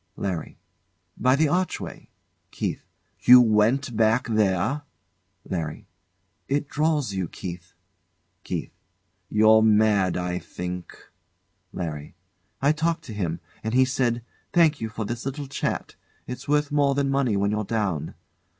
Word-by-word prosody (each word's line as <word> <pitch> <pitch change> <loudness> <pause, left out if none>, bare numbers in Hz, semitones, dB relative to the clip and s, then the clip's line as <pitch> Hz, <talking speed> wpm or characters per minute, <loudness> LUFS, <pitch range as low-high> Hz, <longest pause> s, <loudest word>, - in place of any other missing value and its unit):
LARRY. 90 -5 -4 0.6
By 130 +1 +3
the 155 +2 +3
archway. 180 +4 -2 0.4
KEITH. - - -4 0.3
You 125 +1 +9
went 120 +3 +3
back 110 +2 +3
there? 110 +5 +1 0.7
LARRY. 80 -4 -4 0.6
It 145 +1 0
draws 150 -7 0
you, 95 -2 -2
Keith. 90 0 -8 0.7
KErra. - - -4 0.6
You're 110 +1 +6
mad, 105 -4 +3
I 90 0 -2
think. 90 0 -7 0.7
LARRY. 75 -5 -5 0.5
I 140 - +5
talked 165 +2 -1
to 115 - -8
him, 85 -5 -3 0.2
and 110 +2 -2
he 130 0 +6
said, 120 -2 0 0.3
"Thank 160 -4 +4
you 110 - -2
for 110 0 -4
this 120 +2 -4
little 135 +2 -4
chat. 135 - -3 0.3
It's 125 +2 -7
worth 150 0 +1
more 140 -2 +3
than 140 -1 +1
money 135 -7 +1
when 100 +1 +1
you're 105 0 -1
down." 95 -8 -2
110 Hz, 130 wpm, -25 LUFS, 95-140 Hz, 0.7 s, You